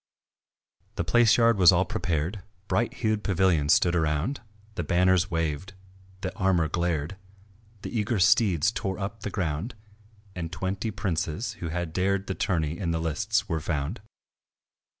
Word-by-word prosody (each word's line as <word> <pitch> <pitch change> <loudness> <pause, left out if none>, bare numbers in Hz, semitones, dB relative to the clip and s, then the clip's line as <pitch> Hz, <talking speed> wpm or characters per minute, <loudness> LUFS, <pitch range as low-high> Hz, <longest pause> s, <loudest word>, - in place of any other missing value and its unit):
The - - -1
palace 120 -2 +4
yard 115 -3 +4
was 90 -1 +8
all 95 +1 +2
prepared; 85 +4 -2 0.3
Bright 120 - +1
hued 110 -3 -1
pavilions 90 -6 +3
stood 85 -1 +3
around, 80 - 0 0.3
The 85 - -3
banners 90 +3 +3
waved, 80 +2 -2 0.5
the - - -4
armour 95 -5 +2
glared, 85 +1 -2 0.7
The - - -6
eager 110 +1 0
steeds 95 -1 +4
tore 95 -4 -3
up 100 +2 -5
the 105 - -4
ground, 95 +4 -3 0.6
And 85 -2 -5
twenty 95 +4 -3
princes 90 0 -2
who 85 - -4
had 85 -1 -3
dared 95 +1 0
The 95 - -3
tourney 80 -2 -1
in 90 - -2
the 80 -1 0
lists 80 -2 -1
were 80 -1 -2
found. 75 - -3
90 Hz, 150 wpm, -27 LUFS, 80-100 Hz, 0.7 s, was